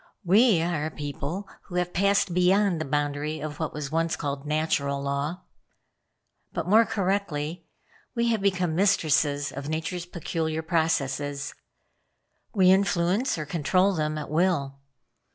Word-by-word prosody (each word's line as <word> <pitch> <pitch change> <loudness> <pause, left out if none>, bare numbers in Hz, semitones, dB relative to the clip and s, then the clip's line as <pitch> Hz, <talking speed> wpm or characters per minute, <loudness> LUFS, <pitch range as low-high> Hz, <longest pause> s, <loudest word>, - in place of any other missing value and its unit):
We 200 -1 +5
are 160 -3 -1
a - - -3
people 150 +6 -5 0.2
who 175 - -9
have 180 0 -1
passed 200 -1 +2
beyond 180 0 +3
the - - -2
boundary 145 +2 -1
of 150 -1 -6
what 160 - -2
was 150 -2 -5
once 165 +1 +1
called 140 0 -4
Natural 145 -2 0
Law. 140 +6 -3 1.1
But, - - -3
more 220 +4 +5
correctly, 180 -5 -2 0.5
we 235 0 +1
have 225 -3 +1
become 180 -4 +1
mistresses 155 -6 +2
of 140 +2 -6
Nature's 170 +3 -3
peculiar 160 -1 -3
processes. 145 -4 -1 1.0
We 185 -4 +5
influence 190 +4 +2
or 155 - -3
control 180 +6 +2
them 155 -2 -1
at 150 - -6
will. 155 -5 +1
165 Hz, 135 wpm, -26 LUFS, 145-185 Hz, 1.1 s, We